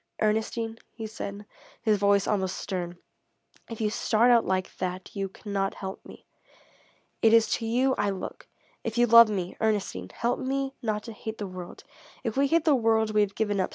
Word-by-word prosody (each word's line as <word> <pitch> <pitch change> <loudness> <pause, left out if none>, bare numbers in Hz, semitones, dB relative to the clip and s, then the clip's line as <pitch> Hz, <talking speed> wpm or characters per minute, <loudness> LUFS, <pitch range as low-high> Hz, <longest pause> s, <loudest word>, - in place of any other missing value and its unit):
"Ernestine," 225 +1 -1 0.2
he 225 - -6
said, 205 -1 -6 0.3
his 215 -3 +2
voice 200 0 +3
almost 190 -3 0
stern, 175 -2 -4 0.7
"if 230 - -7
you 215 -2 0
start 235 +2 +3
out 235 -2 +5
like 185 0 -1
that 185 +2 -4
you 195 -1 -2
cannot 195 0 -3
help 190 -1 -7
me. - - -14 1.0
It 225 0 +5
is 230 -1 +6
to 225 - -5
you 255 +4 +2
I 205 - +2
look. 195 -1 -6 0.4
If 225 0 -4
you 240 - +5
love 230 -1 +8
me, 185 -4 -3
Ernestine, 200 - -1
help 240 +1 -1
me 270 +1 -2
not 215 -2 -2
to 230 - -8
hate 220 +1 -6
the 205 - -4
world. 185 -2 -9 0.4
If 230 -3 -2
we 275 +1 +3
hate 330 +2 +2
the 310 - +5
world, 225 -3 +2
we 210 - +4
have 200 -1 0
given 205 -2 0
up. 185 - 0
215 Hz, 190 wpm, -27 LUFS, 195-230 Hz, 1.0 s, love